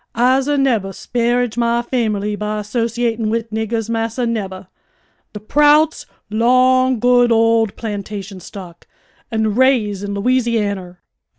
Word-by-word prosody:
I'se 260 +3 +2
nebbah 260 -9 +1
'sparrage 240 +2 -1
my 235 0 +1
famerly 210 -4 -1
by 210 0 -3
'sociatin' 230 0 -1
wid 225 0 -2
niggahs, 220 0 -2
massa, 230 +1 -2
nebbah. 195 -5 -4 0.7
De 210 - -6
Prouts 295 +7 +3 0.2
'long 255 +3 +3
good 245 +1 +3
old 225 -1 +2
plantation 205 -2 -6
stock, 175 -2 -11 0.4
an' 220 -2 0
raise 225 -5 +2
in 200 0 -4
Lousianner!" 205 -5 -1
225 Hz, 115 wpm, -18 LUFS, 210-245 Hz, 0.7 s, Prouts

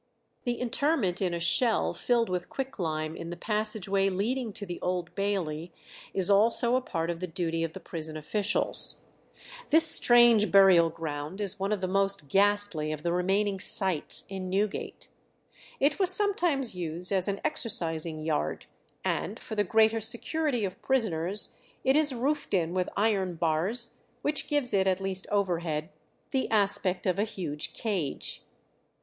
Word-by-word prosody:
The 240 -1 -2
interment 250 - 0
in 185 -2 0
a 170 - -3
shell 220 +8 +1
filled 235 -2 0
with 180 -1 -4
quicklime 160 - -4
in 170 - -8
the 175 - -7
passage 215 0 -1
way 195 0 +1
leading 225 +5 -2
to 205 - -4
the 175 -2 -7
Old 180 -1 -3
Bailey 180 -5 -3 0.4
is 190 -2 +1
also 230 +4 +3
a 255 - +1
part 165 -7 -3
of 170 - -7
the 185 - -4
duty 165 -1 -3
of 165 -1 -4
the - - -8
prison 160 -1 -5
officials. 205 +7 +2 0.7
This 320 +1 +6
strange 240 - +6
burial 190 -4 +6
ground 155 +2 -6
is 200 -1 -2
one 195 +2 -2
of 210 -3 -1
the 185 - -1
most 195 -5 0
ghastly 200 -5 +1
of 150 -1 -6
the 170 - -1
remaining 195 +2 0
"sights" 185 -4 +5
in 190 -2 -6
Newgate. 200 +2 -3 0.7
It 285 +5 +1
was 375 -2 +3
sometimes 350 - 0
used 175 +1 -4
as 190 -1 +1
an 200 0 -2
exercising 165 - -1
yard, 155 -1 -3 0.4
and - - -2
for 225 - -10
the 205 -1 +1
greater 220 +3 +2
security 245 +2 -1
of 185 - -7
prisoners 205 -7 0 0.3
it 265 +1 +2
is 305 -1 +3
roofed 270 -1 -2
in 170 -2 -1
with 185 -1 -1
iron 200 -4 0
bars 175 +9 +2 0.3
which 295 -1 -1
gives 285 -6 +3
it, 195 -1 +2
at 185 0 +1
least 190 -1 -3
overhead, 170 -6 -1 0.4
the 265 - -1
aspect 200 -3 0
of 185 0 0
a - - +2
huge 165 -8 -5
cage. 190 -11 -3
195 Hz, 160 wpm, -27 LUFS, 170-225 Hz, 0.7 s, This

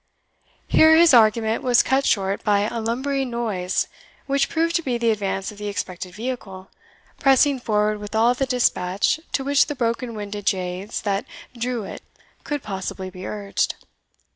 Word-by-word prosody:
Here 315 0 +6
his 335 -3 +6
argument 220 -1 +4
was 245 -2 +4
cut 270 +1 +1
short 195 -1 0
by 205 -1 +3
a 225 +3 -2
lumbering 265 +4 -1
noise, 210 -7 -1 0.4
which 275 0 +1
proved 335 +1 0
to - - -3
be 255 -6 -1
the 235 -1 +2
advance 195 -1 -2
of 210 - -14
the 210 - -4
expected 185 -3 -5
vehicle, 210 -6 -6 0.5
pressing 270 0 +4
forward 210 -2 0
with 205 +1 -7
all 230 +2 +4
the 265 +2 -2
dispatch 205 -3 +1
to 270 - 0
which 280 +1 +3
the 295 - -4
broken 235 -1 -2
winded 205 -1 -6
jades 185 +3 -2
that 200 +2 -1 0.3
drew 240 -1 -2
it - - -8 0.4
could 290 -2 -3
possibly 190 -1 -5
be 185 0 -8
urged. 205 -2 -2
225 Hz, 165 wpm, -22 LUFS, 200-255 Hz, 0.5 s, Here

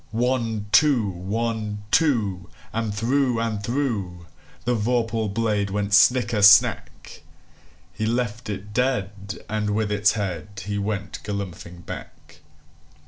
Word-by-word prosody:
One, 115 -2 -1
two! 140 -9 +4
One, 105 +3 -3
two! 105 - +1 0.2
And 115 -1 -1
through 120 +3 +1
and 115 -2 -1
throughThe 100 -7 -2 0.5
vorpal 115 -1 0
blade 105 -2 0
went 100 +1 -2
snicker 115 0 +4
snack! 105 0 +4 0.7
He 110 - -2
left 115 -1 -2
it 105 0 -6
dead, 105 -5 -2
and 105 -1 -2
with 110 -1 0
its 105 0 +3
headHe 100 +1 -4
went 100 -1 -3
galumphing 90 -4 -6
back. - - -10
105 Hz, 110 wpm, -24 LUFS, 100-115 Hz, 0.7 s, two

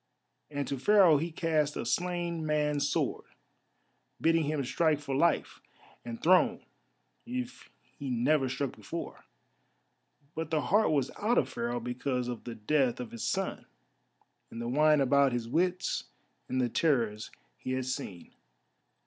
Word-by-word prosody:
And 145 -2 -3
to 140 - -3
Pharaoh 185 -1 +6
he 165 +4 -2
cast 155 -2 0
a - - -3
slain 175 +3 -1
man's 150 -2 +1
sword, - - -1 0.9
bidding 165 -1 +3
him 150 -1 -1
strike 155 +3 +2
for 145 -2 -5
life 170 +5 +1 0.4
and 115 -1 -6
throne 185 +2 +3 0.6
if 250 0 -5 0.3
he 140 - -4
never 130 +3 +2
struck 135 0 -3
before; - - -7 1.1
but 160 -1 -4
the 155 -2 +1
heart 210 +8 +3
was 140 -4 +1
out 230 +4 +2
of - - +2
Pharaoh 120 +1 -2
because 125 +1 -2
of 120 -2 -6
the 120 - -6
death 125 +3 +1
of 125 -2 -6
his 115 - -6
son, - - -2 0.8
and 115 - -8
the 120 - -3
wine 150 +3 +4
about 140 0 +4
his 120 -2 -2
wits, 180 +7 0 0.4
and 130 - 0
the 125 - +2
terrors 115 -8 0 0.3
he 130 - -3
had 130 0 -1
seen. 125 -9 -5
145 Hz, 150 wpm, -30 LUFS, 125-165 Hz, 1.1 s, Pharaoh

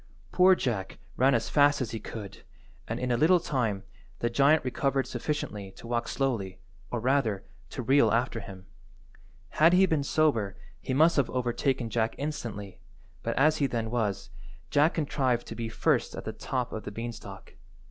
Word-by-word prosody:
Poor 185 +1 +6
Jack 110 - -3 0.2
ran 130 +1 +4
as 115 - 0
fast 145 -1 +4
as 125 -5 -3
he 115 - -4
could, 105 -2 -8 0.5
and, - - -3
in 125 0 -1
a 120 - +2
little 175 +7 +5
time, 120 - -1 0.3
the 120 - -1
giant 140 +4 +4
recovered 135 +1 0
sufficiently 115 -7 -4
to - - -13
walk 120 0 -1
slowly, 110 -9 -2 0.3
or 120 - -2
rather, 120 -5 +1 0.3
to 125 - -5
reel 135 +4 +4
after 120 0 0
him. 95 -3 -10 1.0
Had 165 +3 +7
he 190 +1 +6
been 160 -5 +1
sober 140 -9 +1 0.2
he - - -5
must 160 +4 +4
have 140 - +2
overtaken 125 -1 -1
Jack 115 -1 0
instantly, 115 -10 -5 0.4
but - - -2
as 155 +3 +4
he 140 - +2
then 115 -3 -3
was, 100 -7 -2 0.4
Jack 150 +3 +3
contrived 130 -6 0
to - - -7
be 115 0 -4
first - - 0
at - - -7
the - - -4
top 125 -2 -3
of 110 - -4
the 100 - -6
beanstalk. 115 +2 -8
125 Hz, 175 wpm, -28 LUFS, 110-145 Hz, 1.0 s, Had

